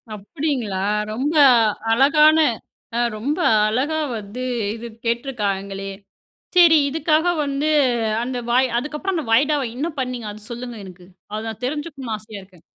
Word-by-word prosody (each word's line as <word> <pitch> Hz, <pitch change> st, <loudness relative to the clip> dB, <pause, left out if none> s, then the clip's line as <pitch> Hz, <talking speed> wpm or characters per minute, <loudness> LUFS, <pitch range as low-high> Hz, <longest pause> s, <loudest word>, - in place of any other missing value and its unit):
அப்படிங்களா! 245 Hz, -, -3 dB, 0.4 s
ரொம்ப 285 Hz, +7 st, -1 dB, 0.6 s
அழகான 300 Hz, +5 st, +5 dB, 0.6 s
ஆ -, -, +1 dB, 0.2 s
ரொம்ப 285 Hz, +10 st, -2 dB, 0.3 s
அழகா 280 Hz, +8 st, 0 dB, 0.2 s
வந்து 210 Hz, +4 st, -8 dB, 0.4 s
இது 235 Hz, +1 st, -8 dB, 0.2 s
கேட்டுருக்காங்களே. 200 Hz, -5 st, -2 dB, 0.7 s
சரி 340 Hz, -2 st, +7 dB
இதுக்காக 315 Hz, +2 st, +1 dB, 0.2 s
வந்து 280 Hz, +2 st, -1 dB, 0.6 s
அந்த 250 Hz, 0 st, -3 dB
வாய் 255 Hz, +2 st, +4 dB
அதுக்கப்புறம் 300 Hz, +7 st, -4 dB
அந்த 305 Hz, -, -3 dB
வாய்தாவ 285 Hz, +4 st, +3 dB
என்ன 305 Hz, +5 st, -1 dB
பண்ணீங்க. 250 Hz, -4 st, -3 dB
அத 210 Hz, 0 st, -11 dB
சொல்லுங்க 240 Hz, -1 st, -6 dB
எனக்கு. 180 Hz, -1 st, -13 dB, 0.2 s
அத 215 Hz, +1 st, -3 dB
நான் 220 Hz, +3 st, -9 dB
தெரிஞ்சுக்கணும்னு 275 Hz, -5 st, -4 dB
ஆசையா 210 Hz, -2 st, -10 dB
இருக்கு. 185 Hz, -3 st, -21 dB
255 Hz, 125 wpm, -21 LUFS, 215-300 Hz, 0.7 s, சரி